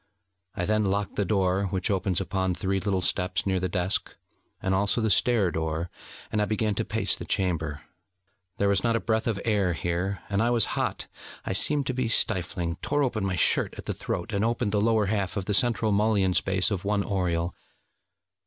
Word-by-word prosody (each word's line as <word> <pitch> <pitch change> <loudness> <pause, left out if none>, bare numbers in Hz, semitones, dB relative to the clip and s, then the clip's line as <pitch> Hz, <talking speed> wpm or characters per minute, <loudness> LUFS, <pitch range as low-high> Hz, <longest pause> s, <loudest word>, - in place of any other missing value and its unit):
I 90 - -1
then 110 +1 +1
locked 100 +1 -1
the 100 - +1
door 95 0 +1
which 95 +1 -1
opens 95 -2 0
upon 95 -1 -1
three 95 0 -1
little 95 -1 -1
steps 90 +1 0
near 95 -1 +1
the 90 0 -2
desk, 90 +1 -1 0.4
and 95 - -1
also 100 +4 +2
the 110 -2 +1
stair 110 -5 +3
door; 80 +1 -3 0.4
and 105 - +1
I - - +2
began 110 0 0
to - - -1
pace - - 0
the - - -7
chamber. 80 -6 -1 0.8
There 100 - +1
was 100 -1 +2
not 115 -1 +2
a - - +2
breath 110 0 0
of 110 -4 0
air 100 -5 +2
here, 85 +4 -2
and 100 +1 0
I 115 - +2
was 120 -3 +3
hot; - - -1 0.4
I - - -1
seemed 145 +8 +3
to 130 - -1
be 125 -1 -1
stifling, 90 -5 +1
tore 145 +7 0
open 115 -6 -1
my 95 -1 -1
shirt 85 - +3
at - - -8
the - - -2
throat, - - -4
and 100 +1 +1
opened 115 -1 0
the 105 0 +1
lower 110 -1 +3
half 100 0 -1
of 95 - -2
the 105 - -1
central 115 -1 +3
mullion 100 -2 +2
space 95 +3 +1
of 95 -3 -2
one 100 0 0
oriel. 90 -3 -1
100 Hz, 205 wpm, -26 LUFS, 90-110 Hz, 0.8 s, stair